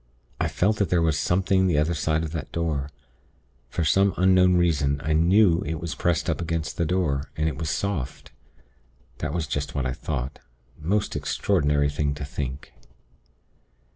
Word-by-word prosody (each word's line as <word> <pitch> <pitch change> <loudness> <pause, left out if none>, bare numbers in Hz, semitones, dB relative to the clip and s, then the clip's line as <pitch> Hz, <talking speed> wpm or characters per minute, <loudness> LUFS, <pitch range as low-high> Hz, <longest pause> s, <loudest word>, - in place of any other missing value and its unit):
I - - +1
felt 105 +3 +1
that 100 -5 0
there 90 - +3
was 80 -2 +2
something 95 +4 +2
the 85 -5 +2
other 75 +3 +2
side 80 0 0
of 80 - -4
that 80 -4 -5
door. 75 -5 -2 0.8
For 85 - -2
some 95 +5 +3
unknown 90 0 +5
reason 70 -5 +2
I 80 - 0
knew 85 +2 +4
it 80 +1 -3
was 85 0 -4
pressed 85 -2 0
up - - -1
against 85 -1 -3
the 85 - 0
door, 75 -5 0
and 80 +1 +1
it 75 - -2
was 80 -2 -2
soft. 90 -7 -3 0.9
That 75 - -2
was 85 0 -1
just 70 +2 -3
what 70 -3 -1
I 65 - -1
thought. 70 -3 -4 0.4
Most 100 +7 -1
extraordinary 75 -7 +1
thing 70 -1 -1
to 70 0 -5
think. 70 -1 -6
80 Hz, 170 wpm, -25 LUFS, 75-90 Hz, 0.9 s, unknown